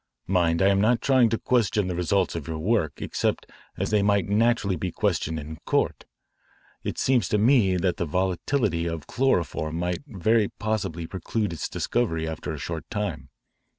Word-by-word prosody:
Mind, 85 Hz, -2 st, +2 dB
I 95 Hz, -, +5 dB
am 100 Hz, 0 st, +3 dB
not 115 Hz, +3 st, +3 dB
trying 130 Hz, -4 st, +4 dB
to 115 Hz, -, 0 dB
question 110 Hz, -5 st, +1 dB
the 90 Hz, -, -2 dB
results 90 Hz, +2 st, +1 dB
of 80 Hz, -4 st, -5 dB
your 80 Hz, -1 st, -3 dB
work 85 Hz, -3 st, +1 dB
except -, -, -1 dB, 0.3 s
as -, -, -2 dB
they 105 Hz, -1 st, +3 dB
might 100 Hz, -2 st, +2 dB
naturally 105 Hz, -1 st, +2 dB
be 90 Hz, +2 st, -3 dB
questioned 80 Hz, -5 st, -1 dB
in 80 Hz, +1 st, -8 dB
court. -, -, 0 dB, 0.8 s
It -, -, -4 dB
seems 130 Hz, -3 st, +2 dB
to 105 Hz, -, +2 dB
me 105 Hz, -4 st, +4 dB
that 90 Hz, -1 st, 0 dB
the 85 Hz, -, -1 dB
volatility 90 Hz, -, 0 dB
of 80 Hz, -4 st, -4 dB
chloroform 85 Hz, -, 0 dB
might 90 Hz, +1 st, -1 dB
very 110 Hz, 0 st, +2 dB
possibly 100 Hz, -6 st, -2 dB
preclude 95 Hz, +3 st, -3 dB
its 80 Hz, -, -4 dB
discovery 80 Hz, -10 st, -1 dB
after 80 Hz, -1 st, -4 dB
a -, -, -5 dB
short 80 Hz, -2 st, -5 dB
time. 95 Hz, -, -3 dB
95 Hz, 175 wpm, -25 LUFS, 85-110 Hz, 0.8 s, I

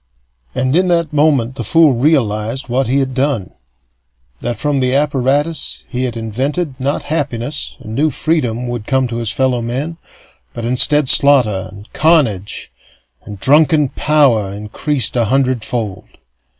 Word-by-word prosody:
And 130 Hz, +2 st, 0 dB
in 185 Hz, +2 st, +3 dB
that 170 Hz, -3 st, 0 dB
moment 145 Hz, -5 st, +2 dB
the -, -, -3 dB
fool 165 Hz, -4 st, +4 dB
realized 120 Hz, -3 st, 0 dB
what 130 Hz, +1 st, 0 dB
he 130 Hz, +3 st, +1 dB
had 135 Hz, -1 st, -1 dB
done: 130 Hz, -7 st, -1 dB, 0.9 s
that, 120 Hz, -1 st, -3 dB
from 145 Hz, +2 st, -1 dB
the 130 Hz, 0 st, 0 dB
apparatus 145 Hz, +2 st, 0 dB
he 130 Hz, -1 st, -3 dB
had 120 Hz, -2 st, -4 dB
invented, 135 Hz, +8 st, -3 dB
not 140 Hz, +2 st, -2 dB
happiness 145 Hz, -3 st, -3 dB
and 110 Hz, -, -9 dB
new 150 Hz, +6 st, +1 dB
freedom 125 Hz, -6 st, -1 dB
would 120 Hz, -3 st, -5 dB
come 130 Hz, -1 st, +1 dB
to 115 Hz, -, -4 dB
his 115 Hz, -2 st, -1 dB
fellow 130 Hz, -1 st, 0 dB
men, 135 Hz, +8 st, -4 dB, 0.6 s
but 115 Hz, -, -5 dB
instead 135 Hz, +4 st, +3 dB
slaughter 120 Hz, -10 st, +4 dB
and 100 Hz, +2 st, -13 dB
carnage 130 Hz, -, +1 dB, 0.5 s
and 100 Hz, -2 st, -9 dB
drunken 150 Hz, -, +3 dB
power 130 Hz, -12 st, +2 dB
increased 105 Hz, +6 st, -2 dB
a 120 Hz, -2 st, +2 dB
hundredfold. 120 Hz, -4 st, -1 dB
130 Hz, 145 wpm, -16 LUFS, 115-145 Hz, 0.9 s, fool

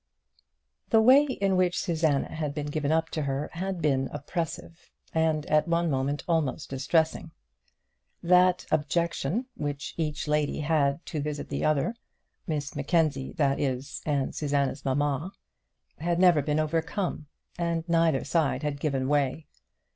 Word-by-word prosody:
The 225 Hz, -, +5 dB
way 260 Hz, +6 st, +7 dB
in 195 Hz, -8 st, 0 dB
which 180 Hz, -1 st, +2 dB
Susanna 160 Hz, -4 st, 0 dB
had 150 Hz, -2 st, -3 dB
been 150 Hz, -1 st, -3 dB
given 150 Hz, 0 st, -1 dB
up 160 Hz, 0 st, +1 dB
to 155 Hz, -, -2 dB
her 140 Hz, 0 st, -2 dB
had 185 Hz, -1 st, -3 dB
been 135 Hz, -3 st, +1 dB
oppressive, 165 Hz, +2 st, -5 dB, 0.2 s
and 160 Hz, -2 st, +1 dB
at 155 Hz, +1 st, +2 dB
one 170 Hz, -1 st, +1 dB
moment 140 Hz, +2 st, -1 dB
almost 160 Hz, -4 st, -1 dB
distressing. 160 Hz, +5 st, 0 dB, 0.9 s
That 180 Hz, +1 st, +4 dB
objection 170 Hz, -, 0 dB
which 145 Hz, -2 st, -4 dB
each 155 Hz, -2 st, -2 dB
lady 150 Hz, 0 st, 0 dB
had 145 Hz, 0 st, +1 dB
to 155 Hz, -, -3 dB
visit 150 Hz, 0 st, -4 dB
the -, -, -2 dB
other, 155 Hz, +8 st, +1 dB, 0.5 s
Miss 150 Hz, -4 st, -3 dB
Mackenzie, 145 Hz, -2 st, 0 dB
that 140 Hz, -5 st, +1 dB
is, 135 Hz, 0 st, -2 dB
and 140 Hz, -3 st, -1 dB
Susanna's 140 Hz, -2 st, -1 dB
mamma, 145 Hz, +6 st, -1 dB, 0.7 s
had 170 Hz, +2 st, 0 dB
never 175 Hz, -4 st, +5 dB
been 150 Hz, +2 st, 0 dB
overcome, 160 Hz, +1 st, -2 dB, 0.3 s
and 170 Hz, -1 st, -1 dB
neither 165 Hz, -5 st, +2 dB
side 155 Hz, -4 st, 0 dB
had 145 Hz, -1 st, -2 dB
given 135 Hz, -3 st, -1 dB
way. 145 Hz, +1 st, 0 dB
155 Hz, 140 wpm, -27 LUFS, 145-170 Hz, 0.9 s, way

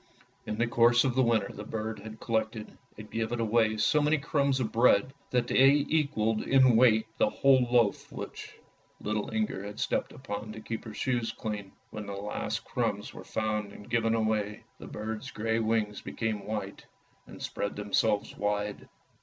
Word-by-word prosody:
In 105 Hz, -, -3 dB
the 120 Hz, -, +2 dB
course 120 Hz, +1 st, +4 dB
of 130 Hz, -3 st, +1 dB
the 130 Hz, -, +3 dB
winter 115 Hz, -5 st, +1 dB
the 105 Hz, -, -7 dB
bird 110 Hz, +1 st, -4 dB
had 110 Hz, 0 st, -9 dB
collected 110 Hz, -1 st, -2 dB, 0.2 s
and 105 Hz, 0 st, -10 dB
given 115 Hz, +1 st, -2 dB
away 110 Hz, -1 st, +2 dB
so 150 Hz, +8 st, +3 dB
many 150 Hz, +2 st, +3 dB
crumbs 140 Hz, -1 st, +1 dB
of 115 Hz, -4 st, -1 dB
bread, 120 Hz, +1 st, +4 dB, 0.2 s
that 125 Hz, -1 st, +1 dB
they 140 Hz, +3 st, +5 dB
equalled 115 Hz, -9 st, +1 dB
in 130 Hz, -3 st, +5 dB
weight 110 Hz, -2 st, +5 dB
the -, -, +4 dB
whole 130 Hz, -2 st, +4 dB
loaf 120 Hz, -4 st, +2 dB
which -, -, -8 dB, 0.4 s
little 105 Hz, 0 st, -2 dB
Inger 215 Hz, -, -1 dB
had 105 Hz, 0 st, -7 dB
stepped -, -, -1 dB
upon 110 Hz, -4 st, -6 dB
to -, -, -8 dB
keep 110 Hz, +1 st, -5 dB
her 110 Hz, -, -7 dB
shoes 120 Hz, -3 st, 0 dB
clean. 105 Hz, -4 st, -5 dB, 0.2 s
When 105 Hz, -1 st, -6 dB
the 100 Hz, -, -4 dB
last 100 Hz, +1 st, -3 dB
crumbs -, -, -2 dB
were -, -, -9 dB
found 105 Hz, -2 st, -2 dB
and 105 Hz, +3 st, -12 dB
given 115 Hz, -1 st, +2 dB
away, 110 Hz, -2 st, -1 dB, 0.2 s
the -, -, -9 dB
bird's 110 Hz, 0 st, -5 dB
grey 110 Hz, +1 st, -1 dB
wings 110 Hz, -2 st, 0 dB
became 105 Hz, -3 st, -3 dB
white 110 Hz, 0 st, -5 dB, 0.4 s
and -, -, -11 dB
spread 100 Hz, -, -3 dB
them 105 Hz, -1 st, -7 dB
selves 105 Hz, -2 st, +2 dB
wide. 105 Hz, 0 st, -2 dB
110 Hz, 180 wpm, -29 LUFS, 105-120 Hz, 0.4 s, they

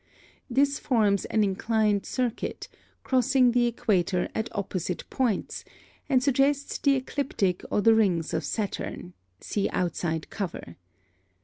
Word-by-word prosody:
(17) -, -, -7 dB
This 280 Hz, +1 st, +3 dB
forms 210 Hz, -6 st, +2 dB
an 220 Hz, -, +1 dB
inclined 210 Hz, +1 st, +1 dB
circuit, 250 Hz, -3 st, -3 dB, 0.4 s
crossing 255 Hz, -1 st, +3 dB
the 240 Hz, 0 st, +3 dB
equator 185 Hz, -6 st, 0 dB
at 220 Hz, +1 st, -2 dB
opposite 185 Hz, -3 st, -3 dB
points, 245 Hz, -8 st, -1 dB, 0.5 s
and 255 Hz, -3 st, +3 dB
suggests 280 Hz, +1 st, +1 dB
the 280 Hz, -1 st, +3 dB
ecliptic 255 Hz, -8 st, -1 dB
or -, -, +1 dB
the 225 Hz, +2 st, +6 dB
rings 185 Hz, -7 st, +1 dB
of -, -, -1 dB
Saturn 200 Hz, -4 st, -4 dB, 0.3 s
(see 205 Hz, -, -1 dB
outside 170 Hz, -2 st, -2 dB
cover). 175 Hz, -, -5 dB
220 Hz, 125 wpm, -27 LUFS, 190-255 Hz, 0.5 s, the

